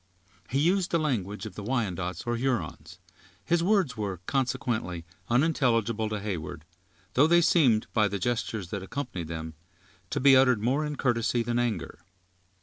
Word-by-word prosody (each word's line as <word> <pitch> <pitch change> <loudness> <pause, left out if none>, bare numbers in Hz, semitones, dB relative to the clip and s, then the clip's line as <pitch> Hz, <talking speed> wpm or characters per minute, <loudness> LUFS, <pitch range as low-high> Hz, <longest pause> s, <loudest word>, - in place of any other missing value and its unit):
He 135 - 0
used 175 +5 +2
the 170 - +2
language 105 - -2
of 110 - -7
the - - -7
Wyandots, 95 -7 -2
or 120 0 0
Hurons; 115 -10 -3 0.5
his 170 0 +2
words 190 -7 +2
were, 100 -4 -3
consequently, 120 -10 -1 0.2
unintelligible 115 -5 +2
to 105 -1 -3
Heyward, 85 -6 -5 0.5
though 145 +4 +5
they 170 +1 +5
seemed, 130 -11 +4
by 110 -1 +3
the 100 - -3
gestures 110 -3 -2
that 100 - -3
accompanied 95 - -5
them, 80 -1 -5 0.6
to - - -1
be 135 +1 +7
uttered 130 -3 +5
more 130 +8 +1
in 150 - -4
courtesy 120 -2 +1
than 120 +1 -1
anger. 110 -8 -2
115 Hz, 155 wpm, -28 LUFS, 100-135 Hz, 0.6 s, be